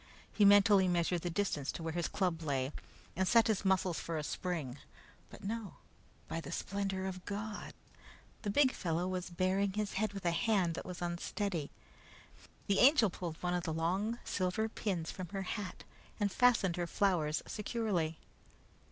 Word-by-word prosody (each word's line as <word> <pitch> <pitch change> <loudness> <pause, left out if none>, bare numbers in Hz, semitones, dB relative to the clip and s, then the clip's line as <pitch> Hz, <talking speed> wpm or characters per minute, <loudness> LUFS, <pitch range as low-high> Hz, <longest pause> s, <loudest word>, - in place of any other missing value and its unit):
He 210 - +4
mentally 200 -1 +7
measured 175 0 +1
the 175 - -2
distance 165 -6 -1
to 165 - -6
where 160 -1 -3
his 175 0 0
club 180 -4 -1
lay 135 -3 -1 0.4
and 190 +1 +1
set 230 +2 +6
his 215 -4 +1
muscles 190 -3 +2
for 165 -1 -3
a 150 - -2
spring. 150 -6 -3 0.5
But - - -13
no 215 -1 -4 0.5
by 165 - -3
the 145 - -8
splendor 195 -1 -2
of 185 -1 -5
God! 210 +1 -5 0.7
The 205 - -2
big 260 +5 +4
fellow 175 -3 -1
was 185 -1 -3
baring 190 +3 +1
his 210 0 -2
head 210 +1 0
with 195 -2 -7
a 170 - +3
hand 185 -2 +2
that - - -6
was 180 -1 -5
unsteady. 175 -1 -2 1.0
The 200 - +2
Angel 255 - +6
pulled 170 -3 -5
one 180 0 +1
of 180 - +1
the 160 - -2
long 190 +8 0
silver 185 +4 0
pins 185 -7 -2
from 185 -1 -6
her 195 +2 -4
hat 195 -1 -5 0.4
and 205 -2 +1
fastened 220 -8 +3
her 175 -1 -1
flowers 170 -6 +1
securely. 205 -8 -1
185 Hz, 170 wpm, -34 LUFS, 170-205 Hz, 1.0 s, mentally